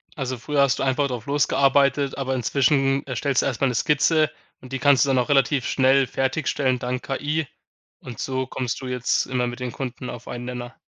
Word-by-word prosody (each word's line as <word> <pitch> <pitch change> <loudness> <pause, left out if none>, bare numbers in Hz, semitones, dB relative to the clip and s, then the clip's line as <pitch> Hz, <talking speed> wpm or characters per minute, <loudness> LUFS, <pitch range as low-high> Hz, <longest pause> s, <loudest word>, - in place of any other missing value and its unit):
Also 130 -3 -3
früher 145 +4 0
hast 140 -2 +2
du - - 0
einfach 135 +1 +1
drauf 125 -4 -5
losgearbeitet, 140 -1 +2
aber 130 -1 -2
inzwischen 135 +2 +1
erstellst 130 +1 0
du - - -2
erst 125 -2 -2
mal 135 - +4
'ne 125 - -2
Skizze. 155 +4 +2 0.3
Und 130 +1 -12
die 135 - -2
kannst 140 -2 +4
du - - -2
dann 130 -1 +3
auch 125 - -1
relativ 135 -2 +2
schnell 135 0 +3
fertigstellen 130 -1 0
dank 125 +1 -3
KI, 145 +2 -2 0.5
und 120 -3 -9
so 130 -1 -2
kommst 125 -3 -3
du 130 - -6
jetzt 125 -1 0
immer 125 -1 -1
mit 120 +1 -6
den 125 - -3
Kunden 125 0 -6
auf 120 -1 -9
einen 120 0 -6
Nenner? 125 0 -6
130 Hz, 210 wpm, -23 LUFS, 125-140 Hz, 0.5 s, mal